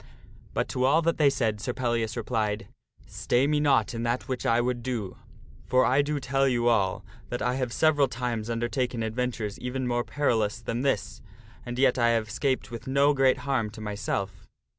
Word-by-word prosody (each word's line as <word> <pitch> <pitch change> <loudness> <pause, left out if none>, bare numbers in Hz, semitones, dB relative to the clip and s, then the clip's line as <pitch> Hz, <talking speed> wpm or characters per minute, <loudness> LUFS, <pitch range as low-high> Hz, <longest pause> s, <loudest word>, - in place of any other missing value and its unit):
But - - 0
to 125 - -1
all 150 +6 +4
that 165 0 0
they 145 -2 +6
said 110 -6 -1
Sir 125 - -2
Pellias 115 -3 -1
replied, 105 -4 -1 0.2
" - - -28
Stay 125 +3 0
me 150 +1 +2
not 140 -4 +2
in 115 - -4
that 120 +2 -1
which 130 -2 -2
I 115 0 +3
would 120 0 -1
do, 115 -6 -4 0.5
for 130 +1 +4
I 135 +3 +4
do 145 0 -2
tell 135 +1 +1
you 120 -2 +1
all 100 -5 +1 0.2
that 120 - -3
I 125 - +1
have 130 -2 -2
several 150 0 +3
times 120 -3 -3
undertaken 120 0 -1
adventures 110 -2 -3
even 125 +1 -3
more 120 0 0
perilous 115 -8 0
than 115 +1 -3
this 135 -7 -1 0.5
and 120 0 -4
yet 130 -1 +3
I 120 0 +4
have 110 -1 -4
'scaped 130 +1 -1
with 115 0 -8
no 140 +2 +4
great 135 -2 +3
harm 130 -6 0
to 110 - -12
myself." 100 -2 -4
125 Hz, 195 wpm, -27 LUFS, 115-135 Hz, 0.5 s, they